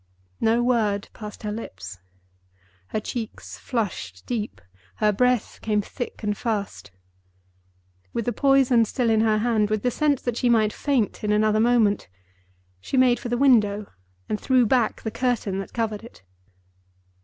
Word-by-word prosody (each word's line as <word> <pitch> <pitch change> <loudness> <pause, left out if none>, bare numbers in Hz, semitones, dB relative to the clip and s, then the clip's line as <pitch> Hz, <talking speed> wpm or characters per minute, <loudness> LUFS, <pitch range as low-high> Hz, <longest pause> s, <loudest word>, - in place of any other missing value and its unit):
No 230 +2 +2
word 215 -5 +1
passed 210 -1 -9
her 210 - -2
lips. 95 - -8 0.9
Her - - -2
cheeks 225 +1 -6
flushed 195 - -4
deep; 215 - -3 0.4
her 210 - +2
breath 250 +2 +1
came 210 -1 +1
thick 245 +1 -7
and 210 0 0
fast. 210 - -3 1.2
With 230 - -3
the 240 - 0
poison 270 -4 +4
still 235 +1 0
in 220 -1 +3
her 220 -1 +3
hand, 215 -2 +1
with 215 -1 -1
the 250 - +2
sense 290 0 +1
that 240 -2 -2
she 245 - +1
might 220 -3 +3
faint 260 -9 -1
in 210 - 0
another 215 0 +3
moment, 225 -3 +3 0.7
she 260 - -3
made 250 -1 +4
for 245 - -5
the 240 - 0
window, 215 -6 +3 0.4
and 210 - -3
threw 255 -2 +3
back 240 0 +1
the 220 - -3
curtain 230 -5 -1
that 195 - -6
covered 225 -2 -2
it. 230 - -14
225 Hz, 155 wpm, -24 LUFS, 210-245 Hz, 1.2 s, poison